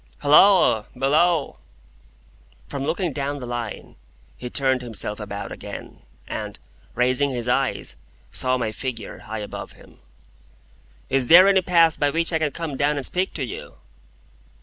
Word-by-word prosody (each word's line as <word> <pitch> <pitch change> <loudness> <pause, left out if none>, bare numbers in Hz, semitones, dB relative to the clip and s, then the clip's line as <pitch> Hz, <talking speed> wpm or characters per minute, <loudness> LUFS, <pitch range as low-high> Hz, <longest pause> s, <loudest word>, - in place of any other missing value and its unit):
"Halloa! 150 - +5
Below!" 150 +3 +2 1.1
From 140 -1 -5
looking 165 +2 -1
down 140 +1 -3
the 130 - -7
Line, 120 -2 -6 0.4
he 125 - -7
turned 130 -1 +1
himself 110 -3 -5
about 100 -1 -6
again, - - -9 0.3
and, - - -5 0.4
raising 130 +3 +2
his 120 -3 -3
eyes, 130 +2 0 0.3
saw 130 0 +2
my 115 -3 -2
figure 130 +2 -6
high 110 0 -6
above - - -8
him. - - -19 1.1
"Is 135 -2 +1
there 180 +6 +9
any 195 -1 +4
path 170 -3 +3
by 145 - +3
which 165 +3 0
I 160 - +2
can 155 -2 0
come 160 -3 -5
down 145 +1 +1
and 140 - -3
speak 185 +1 -2
to 140 - -2
you?" 120 - -8
140 Hz, 150 wpm, -23 LUFS, 125-160 Hz, 1.1 s, there